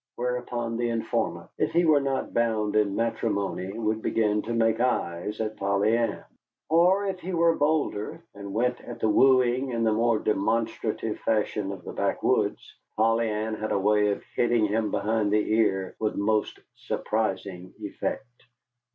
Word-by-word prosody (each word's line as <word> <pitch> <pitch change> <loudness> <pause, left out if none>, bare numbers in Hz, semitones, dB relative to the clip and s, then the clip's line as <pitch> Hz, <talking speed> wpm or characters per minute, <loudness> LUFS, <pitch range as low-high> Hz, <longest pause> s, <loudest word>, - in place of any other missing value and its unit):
Whereupon 120 -1 -3
the 120 0 0
informant, 115 -1 -2
if - - 0
he 170 +1 +3
were 155 -3 +5
not 135 -1 -2
bound 110 -3 0
in 105 -2 +2
matrimony, 100 -4 -1
would 110 -1 -1
begin 105 -2 +1
to 115 - -6
make 115 -1 +2
eyes 105 -5 -1
at 110 -1 -3
Polly 100 +3 +2
Ann. 115 -1 -1 0.5
Or, 180 +5 +4
if 190 -2 -3
he 185 +1 -5
were 170 -1 +3
bolder, 145 -9 -1
and 100 -1 -8
went 125 +4 0
at 120 - -9
the - - +1
wooing 130 +1 +4
in 115 -2 -1
the 110 -1 +3
more 115 +1 +2
demonstrative 110 +1 -1
fashion 105 -2 0
of 95 -3 -8
the - - -7
backwoods - - 0 0.2
Polly 115 +1 +2
Ann 110 +1 -2
had 110 0 -4
a - - +2
way 105 +1 +3
of 100 - -2
hitting 120 -2 +2
him 105 +1 0
behind 105 0 0
the 105 0 +1
ear 95 -4 +1
with 110 -1 -1
most 105 +1 0 0.2
surprising 95 -4 -3
effect. - - -4
110 Hz, 160 wpm, -26 LUFS, 105-120 Hz, 0.5 s, were